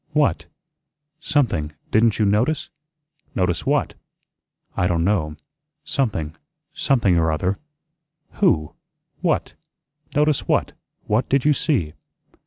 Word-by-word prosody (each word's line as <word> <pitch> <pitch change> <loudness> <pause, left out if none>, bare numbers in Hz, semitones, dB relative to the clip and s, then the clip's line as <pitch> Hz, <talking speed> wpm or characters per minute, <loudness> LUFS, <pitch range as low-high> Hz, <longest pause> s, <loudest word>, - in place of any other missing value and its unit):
"What?" - - +2 0.7
"Something 110 - 0 0.2
didn't 110 0 +4
you 110 - +2
notice?" 120 +10 +1 0.6
"Notice 90 -2 0
what?" - - +1 0.8
"I 90 - +2
don' 85 -2 +1
know. 80 -6 0 0.5
Something 100 - -1 0.4
something 100 -10 +2
or 80 -1 +2
other." 90 +6 -1 0.8
"Who? 80 - +2 0.5
What? - - 0 0.6
Notice 150 -1 +2
what? - - +1 0.3
What 110 +4 0
did 135 0 +2
you 150 - +5
see?" 125 - 0
105 Hz, 105 wpm, -22 LUFS, 85-135 Hz, 0.8 s, you